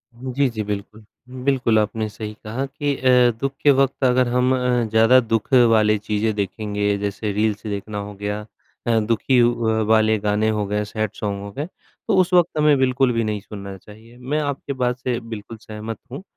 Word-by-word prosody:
हुँ, 130 +2 -6
जी, 140 -1 +2
जी, 110 -2 -4
बिल्कुल। 105 +1 -6 0.4
बिल्कुल, 130 -5 +2
आपने 110 +1 -1
सही 105 0 -7
कहा 115 +6 -3
कि 145 0 -2
अ, 125 -1 +4
दुःख 135 +2 -1
के 145 - +7
वक़्त 135 0 +1
अगर 125 0 +3
हम 125 +1 +2
अ, 125 -1 +1
ज़्यादा 115 +4 +5
दुःख 115 0 -2 0.2
वाली 105 -1 +4
चीज़ें 105 +1 -1
देखेंगे, 105 0 -1
जैसे 100 +1 -3
रील्स 105 0 0
देखना 105 0 -4
हो 100 0 -5
गया 105 0 -2 0.5
अ, 115 -1 +3
दुखी 115 +3 +2
व 115 -2 +1
वाले 110 0 +4
गाने 105 +1 +1
हो 105 -1 -1
गए, 105 +1 -1
सैड 110 -1 -3
सॉन्ग 100 -1 -3
हो 100 - -7
गए, 140 +8 -4 0.4
तो 215 - +2
उस 180 0 -2
वक़्त 175 -3 +3
हमें 150 -1 +4
बिल्कुल 130 -1 +2
भी 115 0 0
नहीं 105 -1 -2
सुनना 100 -1 -8
चाहिए, 110 +5 -16
मैं 135 +5 -2
आपकी 140 -1 -3
बात 125 -1 -1
से 125 -2 -2
बिल्कुल 115 -1 -8
सहमत 110 +1 -7
हूँ। 140 +8 -7
110 Hz, 195 wpm, -21 LUFS, 105-130 Hz, 0.5 s, के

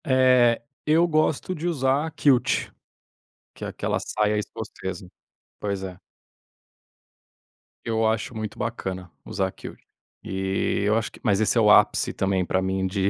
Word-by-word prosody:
Eh, 125 -3 +4 0.3
eu 160 +3 +4
gosto 155 +2 +1
de 165 0 -4
usar 145 -1 +1
kilt. 135 -4 +2 0.8
Que - - -7
é - - -3
aquela - - -2
saia 105 0 0
escocesa. 95 -3 -6 0.5
Pois 100 -2 -3
é. 90 -1 -7 1.8
Eu 115 -1 0
acho 110 +2 -1
muito 110 -1 -5
bacana 95 -6 -4
usar - - -1
kilt. - - -10 0.4
E 95 +1 -1
eu 105 +1 +3
acho 115 -1 -1
que, - - -15
mas 100 -3 +2
esse 110 - +2
é - - +5
o 105 -1 +6
ápice - - +4
também 95 -2 0
para 95 +1 0
mim 95 0 -1
de 95 +1 0
105 Hz, 145 wpm, -25 LUFS, 95-130 Hz, 1.8 s, o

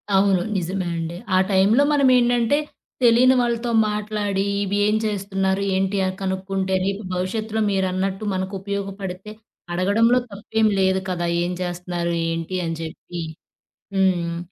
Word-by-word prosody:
అవును. 195 -1 +4 0.2
నిజమే 185 +1 -2
అండి. 165 +1 -4 0.2
ఆ - - +5
టైంలో 200 +8 +4
మనం 280 -2 +4
ఏంటంటే, 240 +2 +3 0.5
తెలియని 245 +2 +6
వాళ్ళతో 235 0 -1 0.2
మాట్లాడి, 210 -2 -1 0.2
ఇవి 200 +1 -1
ఏం 210 - +2
చేస్తున్నారు? 195 -2 -1
ఏంటి? 195 +1 0
ఆ - - +1
కనుక్కుంటే 190 0 -1
రేపు 200 +2 -2
భవిష్యత్తులో 215 +4 -2
మీరన్నట్టు 190 +1 -1
మనకు 190 +1 -3
ఉపయోగపడితే, 195 0 -5 0.4
అడగడంలో 220 +7 +3
తప్పేమి 215 +2 0
లేదు 190 0 +2
కదా! 175 -1 -1 0.2
ఏం 175 - -2
చేస్తున్నారు, 175 -1 -3 0.2
ఏంటి 165 +2 -3
అని 165 -1 -3
చెప్పి. 170 +2 -7 0.7
హ్మ్. 175 -3 +1
195 Hz, 130 wpm, -22 LUFS, 185-210 Hz, 0.7 s, తెలియని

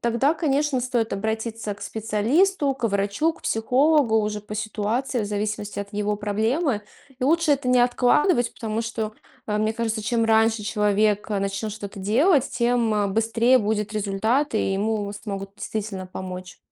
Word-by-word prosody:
тогда, 235 +5 +2
конечно, 295 -4 +1
стоит 240 -3 -1
обратиться 220 +1 -3
к 205 - -13
специалисту, 270 - +1
к 245 -3 -1
врачу, 200 +10 0
к - - -20
психологу 255 +2 +3
уже 210 0 -2
по 210 +1 -8
ситуации, 220 +4 -2
в 210 - -2
зависимости 205 0 -3
от 200 +1 -5
его 210 0 -1
проблемы. 220 +5 0 0.4
И 255 - -1
лучше 325 +2 +3
это 275 -2 -1
не 250 0 +4
откладывать, 245 - +3
потому 220 -1 -3
что, 225 -1 -4 0.3
э, 210 -1 -1
мне 215 +1 +1
кажется, 225 -1 -2
чем 230 +1 +1
раньше 225 0 +3
человек, 210 0 +1
э, 205 - 0
начнет 195 +2 -2
что-то 200 -2 -8
делать, 265 - +3
тем, 235 -1 +1
э, 205 -1 +1
быстрее 225 +4 +3
будет 210 -1 -1
результат 220 +7 0
и 215 - +1
ему 205 0 -1
смогут 195 -2 -6
действительно 200 -3 -4
помочь. 185 0 -7
220 Hz, 160 wpm, -24 LUFS, 205-245 Hz, 0.4 s, не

